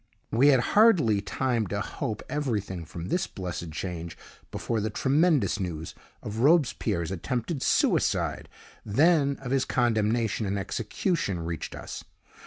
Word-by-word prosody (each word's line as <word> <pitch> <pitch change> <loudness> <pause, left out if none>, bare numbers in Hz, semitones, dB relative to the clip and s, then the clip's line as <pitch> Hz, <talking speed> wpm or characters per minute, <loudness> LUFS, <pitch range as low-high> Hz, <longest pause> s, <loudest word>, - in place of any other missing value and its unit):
We 125 +5 +4
had 135 -4 +6
hardly 170 - +5
time 115 +1 -1
to 100 +2 -2
hope 105 +1 -4
everything 105 - -2
from 85 +3 -7
this 180 - 0
blessed 85 -3 -6
change 85 0 -5 0.3
before 115 -2 -2
the 110 - -1
tremendous 135 - +2
news 80 -4 -4 0.3
of 105 +1 -5
Robespierre's 120 - +2
attempted 125 - -3
suicide, - - +1 0.3
then 140 +5 +3
of 125 -2 -5
his 135 -1 +2
condemnation 115 -2 +1
and 100 +1 -1
execution, 105 - -2
reached 85 -2 -5
us. - - -7
110 Hz, 130 wpm, -27 LUFS, 95-135 Hz, 0.3 s, had